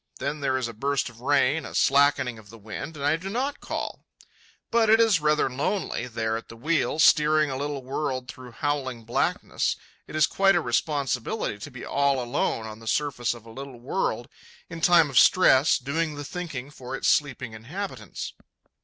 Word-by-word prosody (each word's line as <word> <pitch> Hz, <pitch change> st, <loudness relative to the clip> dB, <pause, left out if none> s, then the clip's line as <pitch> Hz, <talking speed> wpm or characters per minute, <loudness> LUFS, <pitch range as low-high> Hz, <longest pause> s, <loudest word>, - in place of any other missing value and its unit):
Then 150 Hz, -, -3 dB
there 135 Hz, -2 st, 0 dB
is 130 Hz, -2 st, -2 dB
a 115 Hz, -, -7 dB
burst 140 Hz, +4 st, -1 dB
of 120 Hz, 0 st, -16 dB
rain, 145 Hz, +3 st, +2 dB
a -, -, -8 dB
slackening 135 Hz, -4 st, +3 dB
of 105 Hz, -2 st, -16 dB
the 115 Hz, -, -12 dB
wind, 110 Hz, +9 st, -7 dB
and 140 Hz, -, -3 dB
I 145 Hz, +2 st, +3 dB
do 190 Hz, +4 st, -6 dB
not 265 Hz, +7 st, -2 dB
call. -, -, -5 dB, 0.7 s
But 230 Hz, -1 st, +3 dB
it 225 Hz, +1 st, +6 dB
is 225 Hz, -6 st, +4 dB
rather 150 Hz, -1 st, +3 dB
lonely, 140 Hz, -, -2 dB
there 110 Hz, -1 st, -2 dB
at 115 Hz, -, -9 dB
the 115 Hz, -, -10 dB
wheel, 155 Hz, +4 st, 0 dB
steering 155 Hz, -2 st, +4 dB
a -, -, -3 dB
little 140 Hz, 0 st, -3 dB
world 130 Hz, -1 st, -3 dB
through 125 Hz, -1 st, -10 dB
howling 135 Hz, -4 st, -2 dB
blackness. 115 Hz, +2 st, 0 dB, 0.3 s
It -, -, -9 dB
is 155 Hz, -1 st, +5 dB
quite 195 Hz, 0 st, +3 dB
a -, -, +4 dB
responsibility 135 Hz, -, -1 dB
to 105 Hz, -, -7 dB
be 130 Hz, -3 st, -9 dB
all 140 Hz, -1 st, +1 dB
alone 120 Hz, -2 st, -1 dB
on 110 Hz, 0 st, -8 dB
the 115 Hz, -, -12 dB
surface 125 Hz, -3 st, 0 dB
of 115 Hz, -1 st, -14 dB
a 115 Hz, -, -12 dB
little 135 Hz, 0 st, -9 dB
world 120 Hz, -, -2 dB, 0.4 s
in 165 Hz, -, -7 dB
time 165 Hz, -4 st, +5 dB
of 130 Hz, -, +6 dB
stress, 150 Hz, -6 st, +5 dB
doing 150 Hz, +4 st, -2 dB
the 145 Hz, 0 st, -6 dB
thinking 145 Hz, -5 st, -6 dB
for 130 Hz, -3 st, -7 dB
its -, -, -2 dB
sleeping 130 Hz, -5 st, +1 dB
inhabitants. 130 Hz, -, -6 dB
140 Hz, 190 wpm, -26 LUFS, 120-155 Hz, 0.7 s, it